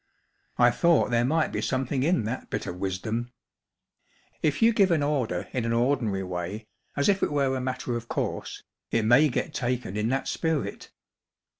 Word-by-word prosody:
I 120 0 +6
thought 170 -2 +3
there 120 0 +3
might 155 +5 +1
be - - -2
something 130 0 -1
in 165 0 +2
that 115 +5 -4
bit - - -3
of 90 - -5
wisdom. 110 +6 -3 1.1
If 150 -2 +1
you 230 +1 +6
give 200 -3 +4
an 160 -4 +2
order 130 -12 -1
in 125 - -1
an 115 0 0
ordinary 115 -5 +1
way* 90 +4 -5 0.3
as 140 - +1
if 195 -1 +3
it - - +1
were 140 -2 +1
a 130 - -2
matter 130 -1 -3
of 115 0 -5
course, - - -3 0.3
it 115 - +1
may 135 +7 +6
get - - -2
taken 125 -5 -2
in 105 +2 0
that 135 +1 -1
spirit 160 -3 -2
125 Hz, 180 wpm, -27 LUFS, 115-145 Hz, 1.1 s, I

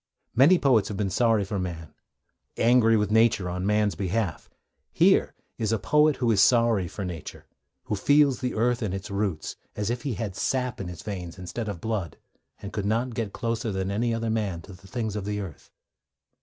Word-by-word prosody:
Many 145 +9 +6
poets 125 -10 +3
have 105 - -5
been 100 -2 -1
sorry 115 0 +2
for 100 +1 -3
man, 85 -4 -5 0.6
angry 115 -1 +4
with 105 -1 0
Nature 110 -4 +3
on 90 +2 -3
man's 105 -1 +2
behalf. 100 -2 -2 0.4
Here - - +3 0.2
is 110 -1 0
a 115 - +2
poet 150 +4 +3
who 120 -2 +1
is 100 -3 +4
sorry 115 -6 +4
for 100 +4 -6
Nature, 85 -3 -7 0.4
who 105 - -2
feels 145 +5 +3
the 125 -1 -2
earth 120 +2 +1
and 100 -4 -2
its 95 +2 -7
roots, 100 -5 -2 0.2
as 105 +2 -1
if 120 - -3
he 135 -6 -3
had 100 -2 -4
sap 125 0 -1
in 95 - -5
his 90 -2 -8
veins 90 -4 -6
instead 100 +5 -5
of 100 -5 -5
blood, 105 -8 -3 0.5
and 100 - -7
could 105 -1 -1 0.2
get 110 -3 -3
closer 115 0 -2
than 95 0 -2
any 115 +4 0
other 115 0 -1
man 100 -7 -2
to 100 - -11
the 90 +2 -15
things 110 +1 -3
of 105 - -3
the 105 +1 -3
earth. 95 -7 -8
105 Hz, 195 wpm, -26 LUFS, 95-115 Hz, 0.6 s, Many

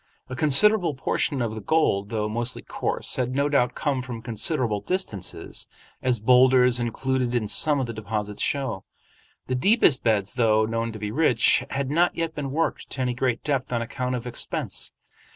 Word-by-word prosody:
A 130 - -5
considerable 165 +4 +4
portion 135 0 -1
of 110 -2 -3
the 110 - -6
gold, 100 -7 +1
though 105 -2 -2
mostly 120 +3 -2
coarse, - - -1
had 125 0 -1
no 140 +1 +2
doubt 125 -4 +1
come 140 -4 -1
from 120 -3 -7
considerable 115 -1 -1
distances, 145 - -4 0.3
as 125 -3 +1
boulders 125 +1 +5
included 125 +1 -1
in 110 -3 0
some 150 +6 +3
of 130 - -1
the 115 - -6
deposits 105 -1 -4
show. 135 -9 -2 0.6
The 130 - -3
deepest 155 - +3
beds, 105 -3 0
though 110 -3 +3
known 115 +1 -2
to - - -7
be 105 0 -4
rich, 125 -3 +3
had 135 0 -3
not 170 +3 +2
yet 165 -1 -2
been 145 -3 -4
worked 160 +5 -2
to 135 - -3
any 125 -1 0
great 125 -1 -1
depth 135 -4 -2
on 120 -1 0
account 125 +2 -3
of 120 -1 -5
expense. 120 -1 -2
125 Hz, 180 wpm, -24 LUFS, 115-140 Hz, 0.6 s, boulders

